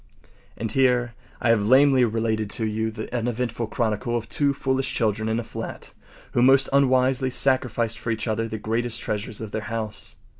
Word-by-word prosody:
And 110 -1 -3
here 125 -2 +2 0.3
I 120 - +3
have 115 -2 +3
lamely 135 +1 +5
related 110 -2 0
to 110 - 0
you 110 +1 -1
the 110 +2 -6
uneventful 120 -1 -2
chronicle 115 +1 -1
of 115 - -5
two 145 -1 +1
foolish 135 -1 -1
children 110 -1 0
in 110 +1 0
a - - -3
flat - - -7 0.4
who 120 - +1
most 135 +2 +5
unwisely 130 -1 +3
sacrificed 120 -4 0
for 115 - -5
each 110 0 -2
other 110 +1 -1
the 110 0 -5
greatest 115 +2 -1
treasures 105 0 -3
of 110 -2 -6
their 110 - -3
house. 110 -2 -5
115 Hz, 180 wpm, -24 LUFS, 110-130 Hz, 0.4 s, lamely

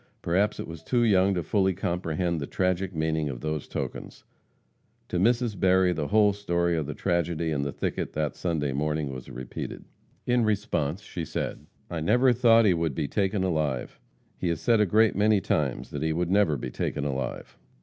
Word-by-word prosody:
Perhaps 100 +5 +1
it - - -5
was 80 -2 -8
too 120 +8 +1
young 100 -3 +4
to 90 - -1
fully 95 +3 +2
comprehend 85 -2 -1
the 70 - -4
tragic 95 0 0
meaning 80 -1 0
of 60 -3 -6
those 75 -1 -3
tokens. - - -6 0.9
To 90 - -1
Mrs. 115 0 +1
Berry 95 -1 +4
the 75 -3 -2
whole 105 -1 +4
story 85 -4 0
of 80 -3 -2
the 75 - -5
tragedy 85 -2 0
in 70 -2 0
the 70 0 -2
thicket - - -3
that 75 -1 -1
Sunday 75 -6 -1
morning 75 0 -1
was 65 -1 -8
repeated. 65 -1 -7 0.4
In 120 -1 +2
response, 100 -5 -1
she 85 - -5
said, - - -4 0.2
"I 85 - -2
never 125 +9 +4
thought 115 -1 +5
he 95 - +5
would 80 -4 -1
be 75 -3 -1
taken 100 +1 0
alive. 80 -8 -1 0.4
He 90 - -1
has 85 -2 0
said 115 -3 +3
a 105 - +3
great 110 +2 +4
many 105 +1 +4
times 75 -7 -1
that - - -4
he 80 0 0
would 85 +2 -1
never 95 -7 +3
be 60 0 -5
taken 70 +3 -2
alive." 65 -2 -4
85 Hz, 190 wpm, -27 LUFS, 75-100 Hz, 0.9 s, thought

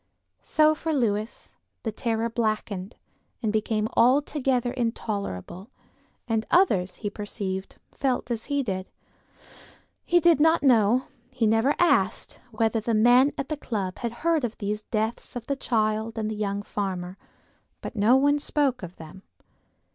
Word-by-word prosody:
So 310 0 +3
for 320 +1 -3
Lewis 215 -4 -2 0.3
the 220 - -2
terror 225 0 -1
blackened 215 -3 -2 0.5
and 215 -1 0
became 215 0 0
altogether 260 -1 +2
intolerable, 205 - -4 0.6
and 225 -2 0
others, 195 - +3
he - - +1
perceived, 195 -2 -5 0.2
felt 255 -2 -1
as 225 -1 -3
he 285 -1 0
did. 190 -5 -4 1.1
He 350 - +3
did 340 -3 +4
not 320 0 +4
know, 240 -1 +4 0.3
he 255 -3 -1
never 225 +6 +3
asked 260 - +1
whether 225 0 0
the 225 +1 -1
men 245 +5 +5
at 275 - -4
the 305 - -1
club 200 -9 -4
had 235 - -2
heard 330 -4 +3
of 235 -2 -3
these 210 +1 -3
deaths 220 +3 -3
of 240 -2 -5
the 280 - -1
child 220 -3 -1
and 215 -1 -2
the - - -3
young 205 -1 -2
farmer; 185 -3 -4 0.6
but - - -7
no 215 +4 +4
one 285 +2 +3
spoke 280 -4 0
of 180 -1 -8
them. 160 +4 -12
225 Hz, 145 wpm, -26 LUFS, 210-265 Hz, 1.1 s, men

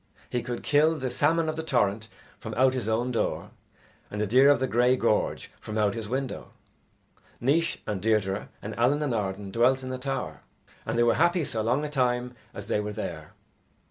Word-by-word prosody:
He 125 - 0
could 120 0 -5
kill 155 +2 +3
the 130 -2 -3
salmon 160 +6 +2
of 155 - -1
the 160 - -3
torrent 110 -8 0 0.3
from - - -6
out 130 +1 +4
his 125 -5 -3
own 120 +3 0
door, 115 - -2 0.6
and 105 - -5
the 105 - +1
deer 130 +7 +5
of 145 - +5
the 130 - +1
grey 125 +1 +3
gorge 115 -4 0
from 110 0 -5
out 105 -2 +2
his 110 -2 -5
window. 130 +1 -4 0.9
Naois 165 +8 +1
and 100 -3 -3
Deirdre 105 -3 0
and 105 +1 -5
Allen 140 +6 +3
and 140 -5 -1
Arden 100 -2 -3
dwelt 130 +4 +3
in 130 0 -4
a 130 - -4
tower, 135 +1 -4 0.5
and 110 +1 -1
they 120 - +4
were 120 - +4
happy 175 0 +3
so 115 -5 -2
long 125 +7 +1
a - - -2
time 125 -2 0 0.2
as 100 -4 -8
they 105 - 0
were 105 0 -3
there. 80 -5 -6
125 Hz, 205 wpm, -27 LUFS, 110-135 Hz, 0.9 s, deer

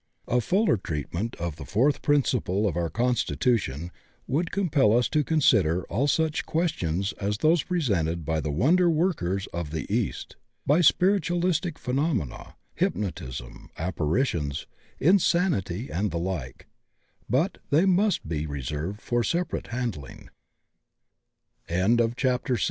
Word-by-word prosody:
A 125 +1 +2
fuller 190 - +2
treatment 85 - -4
of 85 -3 -4
the 80 - -7
fourth 130 - +1
principle 125 - +1
of 85 - -2
our 85 -1 -1
constitution 115 - 0 0.3
would 165 +6 -1
compel 140 - +3
us 120 - +2
to 155 -1 +2
consider 100 - +3
all 130 +8 +1
such 160 +1 +1
questions 100 - -1
as 105 +1 -1
those 160 +6 +3
presented 90 - -1
by 80 +1 0
the 75 - -3
wonder 160 - +3
workers 155 - 0
of 85 -3 -3
the 80 -1 -4
east, - - -2 0.3
by 150 +5 +4
spiritualistic 175 -2 +2
phenomena, 130 - -2 0.2
hypnotism, 65 -11 -4
apparitions, 80 - -1 0.3
insanity, 160 - +2
and 100 +5 0
the 85 - -3
like, 85 -8 -4 0.6
but 140 - +1
they 155 +6 +4
must 195 - +2
be 80 -1 -2
reserved 75 - -4
for 120 0 0
separ 170 - -1
115 Hz, 115 wpm, -26 LUFS, -, 0.6 s, by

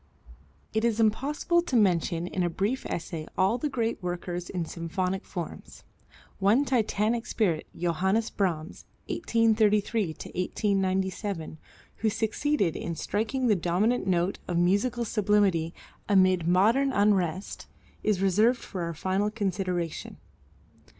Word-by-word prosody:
It 220 +1 +1
is 230 -1 +1
impossible 280 +10 +2
to 315 -7 -3
mention 175 -5 +2
in 185 +1 -3
a 175 - +1
brief 205 +10 -2
essay 160 -2 -4
all 195 +6 +2
the 300 - -1
great 230 -5 -2
workers 175 0 -4
in 175 -3 -2
symphonic 180 +4 -3
forms. 175 -4 -7 0.6
One 210 +8 +4
Titanic 230 -2 0
spirit, 175 -8 0
Johannes 190 +6 0
Brahms, 175 -4 -2 0.2
(1833 220 - +2
1897) 190 0 -2 0.4
who 220 - +1
succeeded 220 - 0
in 170 - -4
striking 225 - -1
the 220 -4 +4
dominant 190 +6 +1
note 180 0 +1
of 175 - -1
musical 205 +7 +2
sublimity 205 -6 +2 0.4
amid 185 -4 +4
modern 225 +10 +4
unrest, 195 -4 0 0.3
is 200 -3 +1
reserved 215 +6 +4
for 190 -5 -7
our 170 -1 -3
final 190 +5 0
consideration. 185 -5 -3
195 Hz, 120 wpm, -27 LUFS, 175-225 Hz, 0.6 s, One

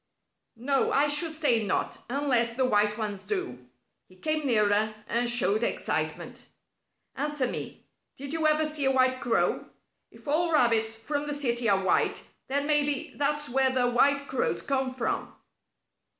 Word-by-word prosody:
"No, 270 +4 0
I 285 +2 +3
should 295 +3 +2
say 240 -7 +3
not 200 - -2
unless 245 -4 +1
the 260 +1 +1
white 210 -2 +1
ones 210 -3 -4
do." 125 -12 -5 0.4
He 185 - -19
came 310 +8 -2
nearer 215 -2 +2
and 240 +1 0
showed 230 -3 +2
excitement. - - -3 0.7
"Answer 295 -2 -1
me. - - -6 0.3
Did 280 +2 -6
you 320 -1 +1
ever 310 0 +3
see 305 -2 0
a 270 - +3
white 255 -1 +2
crow? 235 -2 0 0.4
If - - -18
all 330 +4 +1
rabbits 225 -5 +2
from 285 +6 -4
the 290 - -1
city 240 -5 0
are 195 -1 +2
white, 190 - +1 0.2
then 280 +2 -1
maybe 290 -2 +1
that's 295 +1 -1
where 265 +2 +2
the 250 -1 +1
white 280 +3 +2
crows 260 - -1
come 265 -2 -1
from." 255 -2 -3
260 Hz, 155 wpm, -27 LUFS, 225-290 Hz, 0.7 s, I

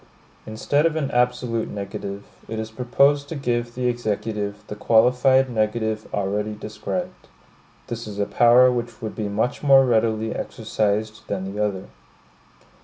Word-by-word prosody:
Instead 145 +8 +1
of 160 - -3
an 145 -3 -1
absolute 125 -2 0
negative, 100 0 -6 0.2
it 110 - -5
is 110 0 -4
proposed 140 +4 +2
to 165 - -4
give 120 -4 -2
the 125 0 -2
Executive 105 -3 -2
the 105 - -7
qualified 125 +5 +4
negative 110 -1 -1
already 105 +2 -2
described. 175 - -5 0.6
This 115 -1 -6
is 105 -1 -7
a 100 - +1
power 120 +4 +5
which 120 -1 -4
would 110 - -4
be 105 -2 -3
much 110 +4 -1
more 135 -2 +6
readily 110 -2 +1
exercised 110 -1 -2
than 95 -1 -4
the 105 +1 -1
other. 95 -3 -2
110 Hz, 145 wpm, -23 LUFS, 105-125 Hz, 0.6 s, more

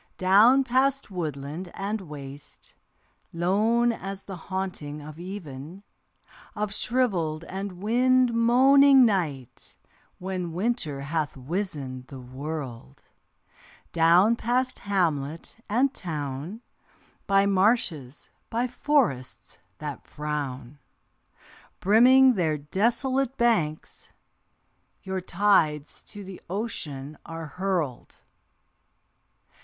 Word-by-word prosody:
Down 215 +9 +6
past 265 -1 +1
woodland 155 0 -5
and 205 +2 -3
waste, 145 -4 -10 0.6
lone 215 +8 +2
as 195 -3 -6
the 195 - -7
haunting 180 -5 -5
of 150 +2 -10
even, 175 -2 -8 0.7
Of 210 -1 -2
shrivelled 185 -12 0
and 195 +2 -5
wind 250 +2 +3
moaning 265 +3 +6
night 155 - -1 0.4
when 180 -2 -4
Winter 180 - -1
hath 150 0 -2
wizened 135 -4 -4
the 135 - -9
world; 130 - -7 0.9
Down 175 +7 +5
past 250 +2 -1
hamlet 165 -6 -1
and 255 +6 +2
town 150 - -5 0.7
By 195 0 +4
marshes, 185 - +1 0.2
by 235 +2 0
forests 135 - -1 0.2
that - - -7
frown, 145 -3 -5 1.0
Brimming 255 +6 +6
their 160 -7 0
desolate 240 - 0
banks, 215 - 0 0.9
Your 190 -1 -3
tides 170 -6 +1
to 205 -1 -8
the 190 -1 -10
ocean 155 - -4
are 165 0 -7
hurled. 170 -6 -3
185 Hz, 90 wpm, -26 LUFS, 150-230 Hz, 1.0 s, Down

